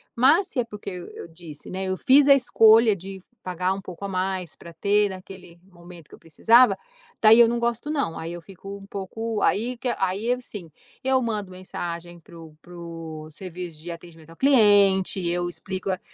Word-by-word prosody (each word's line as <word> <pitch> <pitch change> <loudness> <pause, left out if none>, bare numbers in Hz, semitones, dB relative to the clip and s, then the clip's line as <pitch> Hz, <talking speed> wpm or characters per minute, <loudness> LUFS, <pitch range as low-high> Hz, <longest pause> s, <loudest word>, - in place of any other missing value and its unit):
Mas, 300 +11 +4
se 280 - -4
é 245 - +1
porque 210 -3 -8
eu 180 -1 -8
eu - - -9
disse, 165 -3 -12
né, 190 +1 -4
eu 185 0 -2
fiz 275 +6 +5
a - - +10
escolha 225 -3 +5
de 190 +1 -9 0.2
pagar 185 +1 -1
um 195 - -6
pouco 180 +1 -8
a - - -2
mais, 185 -2 -3
pra 170 - -12
ter 205 +4 +2
naquele 185 -2 -11
momento 175 -3 -15
que - - -19
eu - - -22
precisava, 230 +10 +4 0.4
daí 225 +1 +7
eu 235 - +8
não 240 - -1
gosto 235 +4 -2
não. 280 - -2
Aí 165 +1 -6
eu 175 - -8
fico 195 +3 -10
um 195 - -13
pouco 210 +3 -5
aí 240 +4 0
que 250 - -5
a - - -2
aí, 205 +6 -2
assim, 210 -8 -8 0.3
eu 265 0 +2
mando 210 -4 -3
mensagem 175 -2 -7
para 170 +1 -16
o 160 -2 -13
para 175 - -15
o 165 -2 -8
serviço 175 -1 -8
de 175 - -9
atendimento 165 -2 -12
ao 165 - -15
cliente, 205 -8 +4
eu 175 +1 -1
explico 190 +2 -5
a 185 - -3
190 Hz, 205 wpm, -24 LUFS, 175-225 Hz, 0.4 s, a